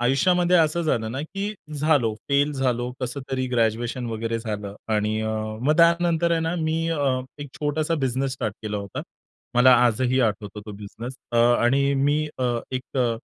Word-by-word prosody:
आयुष्यामध्ये 175 +8 +3
असं 165 +1 +2
झालं 115 -9 0
ना, 135 - -3
की 195 +6 -4 0.2
झालो, 140 -8 +2
फेल 140 +1 +2
झालो, 125 -3 -1
कसं 130 +2 -3
तरी 130 -1 -1
ग्रॅज्युएशन 120 +1 0
वगैरे 115 0 -2
झालं 105 -3 -5 0.2
आणि 105 +1 0
अ, 110 - -1 0.3
मग 150 +5 +2
त्यानंतर 170 0 +3
आहे 165 - +2
ना, 165 +1 -1
मी 160 0 0 0.7
1 145 - -8
छोटासा 155 +2 -1
बिझनेस 130 +1 -1
स्टार्ट 110 -5 -3
केला 105 -1 -3
होता. 100 -1 -5 0.5
मला 125 +1 +7
आजही 125 +3 +2
आठवतो 105 -2 -1
तो 105 - -6
बिझनेस 115 +5 -8 0.2
अ - - +1 0.3
आणि 140 +3 +3
मी 145 +2 +2 0.2
अ, 120 -2 0
एक 130 +1 -5
अ 120 -3 +2
130 Hz, 170 wpm, -24 LUFS, 115-150 Hz, 0.7 s, मला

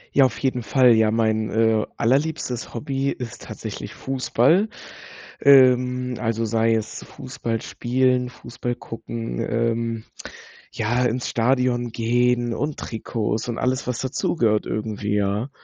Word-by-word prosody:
Ja, 140 - +7
auf 115 -3 -1
jeden 125 0 -1
Fall. 125 +2 +5
Ja, 110 -1 +4
mein, 110 -1 +1
äh, 110 -1 +2
allerliebstes 130 -1 0
Hobby 135 +2 -1
ist 125 -4 -6
tatsächlich - - -7
Fußball. 135 - +2 0.7
Ähm, 125 -2 +5
also 115 -1 -1
sei 115 +1 +2
es 110 0 -4
Fußball 120 -4 -5
spielen, 125 0 +1
Fußball 120 0 -5
gucken, 115 0 -6
ähm, 115 -1 -1 0.7
ja, 120 +3 0
ins 125 +1 -1
Stadion 120 0 +1
gehen 120 +1 +1
und 145 +4 -3
Trikots 110 0 -3
und 120 - -3
alles, 130 0 -1
was 125 -2 -2
dazugehört 120 -4 0
irgendwie, 105 -1 -2
ja. 100 +5 0
120 Hz, 125 wpm, -23 LUFS, 115-125 Hz, 0.7 s, Ja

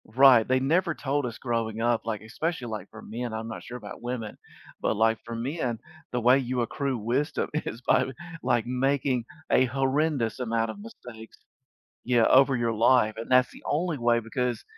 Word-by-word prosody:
Right, 125 0 +6
they 130 0 +3
never 165 +5 +1
told 140 -1 -1
us 115 - -7
growing 115 -3 -2
up, 120 0 +1
like, 110 -3 -3
especially, 130 +5 -3
like, 110 -1 -6
for 110 - -12
men, 120 +1 -5
I'm 110 0 -4
not 110 - -7
sure 125 - -7
about 105 -4 -10
women, 120 -3 -5 0.4
but, - - +1
like, 115 +1 +2
for 115 0 -6
men, 125 0 -2 0.3
the 125 - -1
way 125 +3 +5
you 125 -1 -1
accrue 135 +2 -2
wisdom 120 +7 -1
is 140 -6 -3
by, - - +4 0.4
like, 120 -2 +1
making 130 -1 0 0.3
a 130 - +5
horrendous 135 -1 0
amount 115 -2 0
of - - -11
mistakes, 120 - -12 0.7
yeah, 120 -2 +3
over 135 0 +5
your 120 -1 0
life, 115 0 +3
and 115 +2 -7
that's 125 0 +4
the - - -14
only 165 0 0
way 120 -1 +3
because, 120 +2 -2
125 Hz, 185 wpm, -27 LUFS, 115-135 Hz, 0.7 s, Right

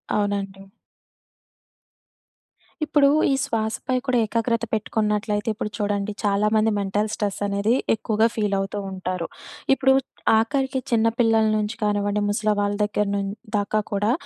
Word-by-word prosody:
అవునండి. 195 -1 -2 2.2
ఇప్పుడూ 290 -2 +4 0.2
ఈ - - +3
శ్వాస 220 -4 -1
పై 255 - +1
కూడా 255 -2 +2
ఏకాగ్రత 230 +1 0
పెట్టుకున్నట్లయితే, 210 0 0
ఇప్పుడు 210 0 -4
చూడండి 205 -1 -1
చాలామంది 210 +2 +2
మెంటల్ 205 +2 -1
స్ట్రెస్సనేదీ 205 +1 0 0.2
ఎక్కువుగా 220 0 +1
ఫీలవుతూ 200 -1 -1
ఉంటారు. 185 -2 -3 0.5
ఇప్పుడు 265 0 +3 0.4
ఆఖరికి 265 +3 0
చిన్న 230 -1 +3
పిల్లల 225 -2 +4
నుంచి 210 +1 -2
కానివ్వండి, 205 0 +1
ముసల 215 +1 0
వాళ్ళ 205 0 0
దగ్గర 210 0 0
నున్ 200 -1 -1 0.3
దాకా 205 +1 0
కూడా, 205 +2 +1
210 Hz, 120 wpm, -23 LUFS, 205-225 Hz, 2.2 s, ఇప్పుడూ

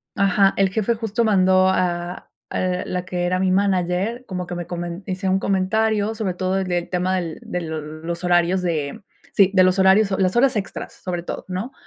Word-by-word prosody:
ajá, 195 0 +3
el 195 -1 +3
jefe 220 +4 0
justo 225 0 -1
mandó 185 -2 +4
a 175 -1 -1 0.3
a 180 0 -1
la 180 0 -3
que 180 -1 -3
era 180 +1 0
mi 190 0 +2
manager, 190 +4 0
como 180 -4 -4
que 175 - -6
me 175 -1 -5
comen 175 +1 -5
hice 190 +1 -2
un 190 +1 +2
comentario, 210 +3 +1
sobre 210 -5 -2
todo 185 +1 -1
de 185 -2 0
tema 180 +1 -1
del 170 -3 -3
de 180 - -3
l 165 -2 -6 0.3
los 170 +1 -4
horarios 175 +1 +3
de, 165 +2 -2 0.3
sí, 195 -1 +5
de 185 -1 +6
los 185 +1 +3
horarios, 195 +2 +5
o 190 - 0
las 185 -1 +1
horas 255 +1 +4
extras, 200 -2 -5
sobre 175 -2 -3
todo, - - -6
¿no?, 190 +7 -4
185 Hz, 200 wpm, -22 LUFS, 180-195 Hz, 0.3 s, de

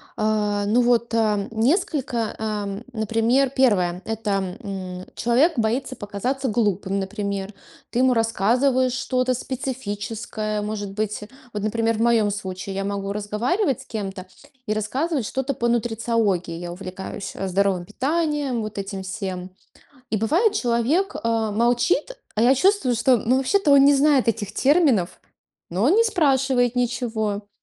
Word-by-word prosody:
А, 210 -1 0
ну, 230 +4 +4
вот, 235 -1 +2
а, 210 -3 +1
несколько, 245 - 0
а, 215 -1 -2
м, 200 +2 -5
например, 230 +4 +2
первое- 195 -10 +2
это, 200 -4 -2
м, 185 -4 -6
человек 265 +8 +2
боится 235 +4 0
показаться 250 +6 -3
глупым, 205 -3 0
например. 200 0 -3 0.4
Ты 240 - -1
ему 255 0 +4
рассказываешь 245 +4 +2
что-то 255 0 0
специфическое, 225 -4 -4
может 205 -1 -4
быть. 210 +1 -3 0.3
Вот, 210 -2 -4
например, 225 +1 0
в - - -2
моем 230 -3 +3
случае 190 -1 -5
я 195 - -2
могу 200 0 -3
разговаривать 240 - -1
с - - -14
кем-то 195 -4 -5 0.4
и 215 - +1
рассказывать 260 +6 -1
что-то 265 +4 -2
по 235 - 0
нутрициологии. 225 -7 0
Я 175 0 -6
увлекаюсь, 190 +2 -7
э, 195 - -3
здоровым 190 -1 +1
питанием, 290 - -1
вот 215 -1 -6
этим 195 0 -4
всем. 185 -1 -5 0.6
И 220 - 0
бывает, 330 - +2
человек, 265 - +1
э, 225 -2 0
молчит, 240 - +1 0.2
а 215 - +1
я 245 +3 +6
чувствую, 275 -4 +2
что, 250 +3 +4
ну, 240 +4 +1
вообще-то 295 +4 +2
он 275 -1 +7
не 285 0 +6
знает 280 -2 +3
этих 215 -2 -1
терминов, 270 - +2 0.5
но 185 +4 -1
он 300 - +5
не 455 - +5
спрашивает 270 - +2
ничего. 225 -4 -1
225 Hz, 145 wpm, -23 LUFS, 205-260 Hz, 0.6 s, он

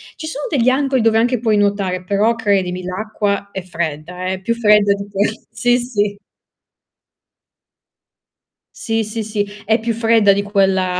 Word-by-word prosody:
ci 315 - -7
sono 290 -2 -5
degli 255 -5 +2
angoli 265 -1 +1
dove 225 0 +3
anche 240 +1 +2
puoi 220 -3 +1
nuotare, 200 -3 0
però 205 +5 +1
credimi 190 -5 0
l'acqua 200 +1 -2
è 190 - -5
fredda, 170 +1 -5
eh, 190 0 -3
più 230 +4 0
fredda 210 -3 +4
di 200 0 -6
que 200 +2 0 0.2
sì, 245 0 +2
sì. 205 -4 -2 2.6
Sì, 225 -1 -1
sì, 215 +1 -4
sì, 210 -1 -2 0.2
è 220 +2 +2
più 230 +1 -1
fredda 225 -2 +4
di 200 +1 +1
quella 190 -3 +1
205 Hz, 155 wpm, -18 LUFS, 190-230 Hz, 2.6 s, fredda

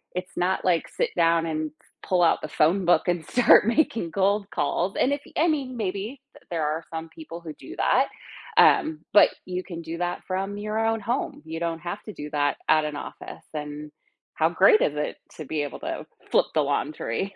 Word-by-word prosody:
it's 180 +1 -5
not, 185 +2 +1
like, 175 -3 +2
sit - - -1
down 165 -1 +3
and 155 -1 -2
f - - -29 0.2
pull 180 -1 +1
out 165 - +4
the - - -4
phone 165 +5 +2
book 175 - +3
and 175 -2 0
start 245 -3 +6
making 230 - +1
cold 200 +1 +1
calls." 175 +6 -1
And 265 - +2
if 285 - -3 0.2
I 325 - +4
mean, 270 -5 -1
maybe 210 +5 -3 0.3
there 165 -2 -1
are 155 +2 -1
some 160 0 -5
people 165 +1 -10
who 160 -2 -7
do - - -11
that, - - +3 0.5
um, 155 0 +5
but 205 - +8 0.2
you 180 0 -3
can 170 -3 -7
do 165 0 -6
that 175 0 -2
from 195 +2 -2
your 210 +1 -3
own 225 0 +1
home. 240 +6 -2
You 160 +1 -5
don't 165 -1 -2
have 175 +5 -5
to 215 - -8
do 150 -4 -7
that 145 -2 +1
at 155 -1 +5
an 150 - -4
office - - -8
and 150 0 -6 0.4
how - - +3
great 435 -3 +5
is 145 - +1
it 150 0 -2 0.2
to 155 - -7
be 150 +2 -2
able 145 - -6
to - - -5 0.3
flip - - +4
the 155 - +3
laundry. 145 +5 -2
170 Hz, 205 wpm, -25 LUFS, 155-200 Hz, 0.5 s, but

